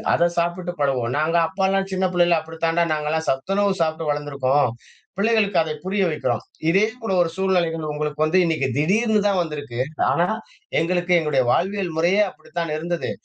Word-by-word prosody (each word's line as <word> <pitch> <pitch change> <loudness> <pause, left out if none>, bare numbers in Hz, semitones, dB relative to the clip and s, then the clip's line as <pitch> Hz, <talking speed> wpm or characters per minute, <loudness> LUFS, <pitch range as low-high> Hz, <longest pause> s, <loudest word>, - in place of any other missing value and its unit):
அத 170 +1 +3
சாப்பிட்டு 175 +1 -1
பழகுவோம். 125 -4 0
நாங்க 160 +3 +1
அப்பாலாம் 195 +2 0
சின்ன 190 0 0
பிள்ளைல 175 -1 +3
அப்படித்தாண்டா 165 +1 -1
நாங்கலாம் 155 +1 -2
சத்துணவு 195 +9 0
சாப்பிட்டு 160 -1 -1
வளர்ந்துருக்கோம். 140 -2 +1 0.5
பிள்ளைகளுக்கு 210 -3 +2
அதை 155 -1 -3
புரிய 195 +1 0
வைக்கிறோம் 125 -7 -1 0.3
இதே 195 +5 +4 0.2
கூட 225 -4 -3
ஒரு 165 - -1
சூழ்நிலைகள் 170 -5 0
உங்களுக்கு 150 0 -3
வந்து 160 +4 +2
இன்னைக்கு 160 -5 0
திடீர்னு 210 +8 +2
தான் 195 -3 +2
வந்திருக்கு 145 -7 -4 0.3
ஆனா, 175 - +2 0.5
எங்களுக்கு 175 +2 0
எங்களுடைய 150 -5 +1
வாழ்வியல் 190 +1 0
முறையே 180 +6 +3
அப்படித்தான் 170 -1 -5
இருந்தது. 170 +2 -3
170 Hz, 150 wpm, -22 LUFS, 150-190 Hz, 0.5 s, இதே